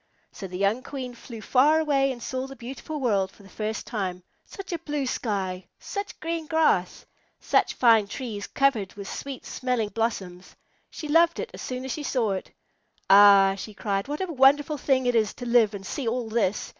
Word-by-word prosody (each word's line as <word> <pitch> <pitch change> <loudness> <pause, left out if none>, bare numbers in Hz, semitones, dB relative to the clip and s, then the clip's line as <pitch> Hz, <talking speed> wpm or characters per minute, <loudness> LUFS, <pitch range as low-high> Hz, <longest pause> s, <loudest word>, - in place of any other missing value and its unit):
So 195 - -8
the 180 0 -7
young 200 +5 +1
Queen 255 -2 -6
flew 235 -1 -10
far 290 +7 +4
away 275 -3 +2
and 240 -2 -8
saw 260 0 -3
the 270 - -10
beautiful 270 +5 -7
world 200 -7 +1
for 205 - -19
the 195 - -15
first 215 +2 -4
time. 185 -5 -4 0.2
Such 390 -3 -8
a 340 - -2
blue 295 -3 -3
sky! 195 -7 -3
Such 400 0 -6
green 330 -1 -3
grass! 310 - +1 0.3
Such - - +1
fine 225 -4 +5
trees 210 -2 -5
covered 255 -9 +1
with 200 -1 -8
sweet 275 -2 -7
smelling 250 -4 -2
blossoms! 195 -5 -4 0.3
She 310 - -7
loved 335 +3 +4
it 485 - -4
all - - -21
as - - -9
soon 255 0 -5
as 265 - -4
she 305 - -4
saw 245 -7 0
it. 190 - -4 0.6
"Ah," 200 -1 +8
she 205 +2 -8
cried, 195 -1 -2
"what 295 +4 -4
a 335 - -5
wonderful 285 +2 +4
thing 260 -1 +1
it 245 - +2
is 220 -3 +1
to 245 - -7
live 235 -3 +3
and 195 -1 -8
see 260 +5 -4
all 235 0 -1
this! 215 -3 0
240 Hz, 200 wpm, -26 LUFS, 205-275 Hz, 0.6 s, Ah